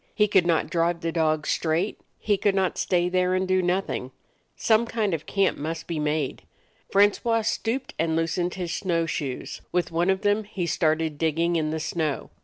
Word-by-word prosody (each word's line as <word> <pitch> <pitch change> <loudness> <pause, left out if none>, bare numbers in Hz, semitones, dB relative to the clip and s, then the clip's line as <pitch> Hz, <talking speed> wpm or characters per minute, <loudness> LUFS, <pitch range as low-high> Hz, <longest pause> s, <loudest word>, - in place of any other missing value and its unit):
He 210 - +4
could 190 -4 +3
not 165 -1 +1
drive 170 0 +1
the 165 - -1
dogs 155 -2 0
straight; 170 +5 0 0.2
he 210 - +1
could 200 0 +1
not 190 -2 0
stay 175 -1 +2
there 185 0 +1
and 185 0 0
do 185 0 +3
nothing. 180 -7 -1 0.5
Seme 225 +1 +3
kind 215 -5 0
of 160 - -1
a - - -24
camp 195 -2 +1
must 160 +3 -4
be 165 -2 -3
made. 150 -2 -1 0.5
Francois 210 +3 +3
stooped 245 +4 -2
and 160 0 +1
loosened 170 +2 -1
his 175 -3 -3
snow 170 -3 0
shoes; 140 -6 -4
with 175 -2 0
one 170 +3 +1
of 190 0 +1
them 205 +1 +1
he 195 -4 -3
started 160 -2 0
dig 160 -2 +1
ging 170 +1 +1
in 155 -2 0
the 160 +1 -2
snow. 155 -2 -2
175 Hz, 200 wpm, -25 LUFS, 160-195 Hz, 0.5 s, He